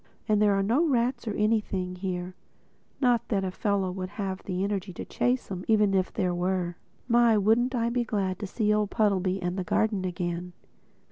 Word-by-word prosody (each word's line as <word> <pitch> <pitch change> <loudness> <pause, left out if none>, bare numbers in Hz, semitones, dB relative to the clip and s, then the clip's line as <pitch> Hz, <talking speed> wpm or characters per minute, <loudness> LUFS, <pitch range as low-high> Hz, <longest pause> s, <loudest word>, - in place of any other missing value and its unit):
And 210 -1 +3
there 205 -1 +4
are 195 - +1
no 240 +11 +2
rats 245 -2 0
or 210 - -2
anything 210 -4 0
here—not 185 +6 -3
that 195 -3 0
a 185 - -2
fellow 195 -1 0
would 185 0 -5
have 190 -2 -3
the 185 0 -2
energy 200 -1 -2
to - - -7
chase 245 -3 -1
'em 185 -1 -4
even 210 -3 +3
if 185 -1 +1
there 185 -4 0
were. 175 0 -1 0.3
My, 235 -2 +5
wouldn't 230 +5 +2
I 230 -1 +1
be 245 0 +1
glad 195 -5 -2
to 205 - -4
see 210 +1 +1
old 210 -1 +1
Puddleby 195 -4 +1
and 180 +2 -2
the - - -1
garden 205 +2 +1
again! 175 -1 -3
200 Hz, 190 wpm, -27 LUFS, 185-220 Hz, 0.3 s, My